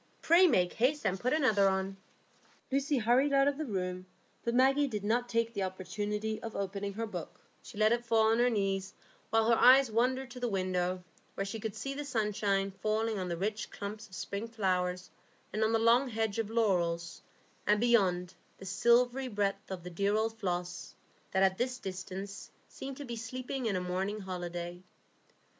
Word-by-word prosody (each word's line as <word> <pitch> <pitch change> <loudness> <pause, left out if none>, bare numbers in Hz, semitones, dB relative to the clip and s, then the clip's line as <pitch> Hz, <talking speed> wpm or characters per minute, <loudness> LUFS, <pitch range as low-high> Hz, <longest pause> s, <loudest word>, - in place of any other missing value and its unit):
Pray 350 +3 +6
make 180 - +2
haste 265 +6 +1
and 190 0 0
put 250 - 0
another 220 -10 +4
on." 190 0 -1 0.8
Lucy 275 +1 +1
hurried 245 +5 +3
out 275 0 +5
of 285 +1 0
the 310 - -3
room, 185 -3 -3 0.4
but 235 0 -1
Maggie 270 +3 +4
did 210 -6 -4
not 240 +3 0
take 230 0 0
the 200 - -3
opportunity 205 +3 -3
of 230 -2 -6
opening 200 0 -3
her 225 +3 -3
book; 220 - -7 0.2
she 220 - -12
let 215 +1 +4
it 240 0 +1
fall 225 -2 +3
on 225 - +2
her 245 +1 +4
knees, 195 -3 -1 0.3
while 225 0 +3
her 230 - +5
eyes 255 +1 +7
wandered 255 +3 +1
to 250 - -8
the 245 - -1
window, 185 -2 -1 0.3
where 195 - -2
she 210 +3 -5
could 215 0 -4
see 275 +5 -4
the 290 +1 -4
sunshine 210 -6 0
falling 220 0 0
on 180 -1 -3
the 170 - -2
rich 210 +4 -2
clumps 210 +2 -7
of 190 - -12
spring 200 +6 -4
flowers 185 -4 -1 0.4
and 215 - +1
on 220 - +2
the 225 - +3
long 235 +4 +4
hedge 220 -1 -1
of 220 -2 -1
laurels, 175 -7 0 0.5
and 210 +1 +4
beyond, 190 -6 +2 0.2
the 190 - -11
silvery 245 +6 +3
breadth 205 -2 -2
of 185 -3 -6
the 180 - -7
dear 200 +4 +1
old 220 +1 0
Floss, 175 -2 -3 0.3
that 190 - +2
at 190 0 +2
this 255 +1 -1
distance 190 -1 -6 0.2
seemed 270 -1 -8
to 290 - -7
be 240 -2 -5
sleeping 250 +2 -4
in 205 - 0
a - - +1
morning 190 +4 -2
holiday. 175 -1 -5
215 Hz, 190 wpm, -31 LUFS, 190-240 Hz, 0.8 s, eyes